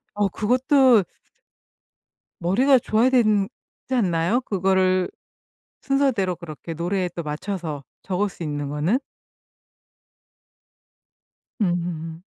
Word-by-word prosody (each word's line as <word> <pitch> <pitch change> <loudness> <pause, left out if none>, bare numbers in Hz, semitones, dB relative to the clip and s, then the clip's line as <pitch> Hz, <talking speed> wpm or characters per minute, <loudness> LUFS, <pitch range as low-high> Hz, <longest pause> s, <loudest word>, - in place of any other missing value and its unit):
어 205 -1 +2
그것도 250 +2 +4 1.3
머리가 250 +10 +3
좋아야 225 +2 +2
되는 215 -6 +3 0.4
지 260 - -1
않나요? 185 +1 +1
그거를 190 -3 +1 0.7
순서대로 265 -10 +1
그렇게 165 -2 -8
노래에 180 +3 -1
또 170 - -4
맞춰서 155 -1 -4 0.2
적을 195 +2 -1
수 180 - -9
있는 145 -2 -3
거는? 155 - +1 2.6
음. 170 -3 -2
190 Hz, 200 characters per minute, -23 LUFS, 170-225 Hz, 2.6 s, 그것도